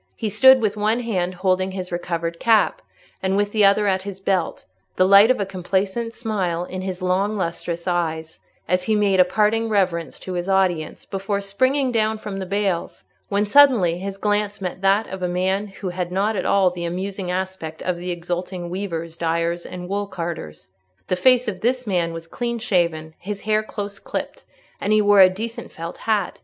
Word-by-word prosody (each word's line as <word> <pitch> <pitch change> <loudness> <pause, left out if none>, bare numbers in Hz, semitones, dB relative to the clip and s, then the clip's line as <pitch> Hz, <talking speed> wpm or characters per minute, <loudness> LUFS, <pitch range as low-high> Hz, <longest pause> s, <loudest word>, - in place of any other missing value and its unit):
He 220 - -2
stood 260 +4 +6
with 210 -2 0
one 215 +3 +1
hand 185 -6 -2
holding 185 +1 0
his 185 -2 -5
recovered 170 -1 -3
cap, 225 -2 +3 0.4
and 190 +1 0
with 205 0 +1
the 215 -1 +2
other 200 +1 +5
at 190 -1 +1
his 195 -1 -7
belt, 190 -3 -1 0.3
the 185 - +4
light 200 +3 +8
of 255 - +3
a 200 - 0
complacent 195 +4 -2
smile 190 -7 -2
in 185 +1 -6
his 185 -1 -5
long 195 +4 +1
lustrous 170 -1 -3
eyes, 160 -2 -2 0.3
as 180 +1 +1
he 220 - +2
made 200 -2 +2
a - - +9
parting 215 +4 +1
reverence 180 -6 0
to 185 - -6
his 175 +1 -3
audience, 185 -5 0
before 195 +1 -2
springing 255 +7 +1
down 220 -1 +1
from 205 -2 -6
the 190 - -5
bales—when 200 +1 -2
suddenly 210 -9 +5
his 195 +1 -5
glance 205 0 0
met 185 -1 -5
that 195 +3 +3
of 190 0 -7
a 180 - 0
man 190 +3 0
who 195 -1 -6
had 175 0 -4
not 200 +4 0
at 185 - -1
all 190 -2 +4
the 175 -1 -6
amusing 185 +2 -4
aspect 180 -3 -4
of 180 -1 -1
the 180 +1 -5
exulting 175 0 -4
weavers, 170 -4 -4
dyers, 170 +1 -1
and 180 -1 -7
woolcarders. 170 - -5 0.4
The - - +2
face 250 +5 +4
of 195 -4 -3
this 250 +2 0
man 175 -5 0
was 165 0 -7
clean 235 +7 -3
shaven, 170 -8 0
his 200 +2 -5
hair 215 0 +1
close 205 -2 -6
clipped, - - -6 0.3
and 205 - 0
he 215 - +5
wore 205 -1 +6
a 185 - +9
decent 225 +5 -6
felt 165 +1 -7
hat. 210 -4 0
190 Hz, 190 wpm, -22 LUFS, 175-210 Hz, 0.4 s, a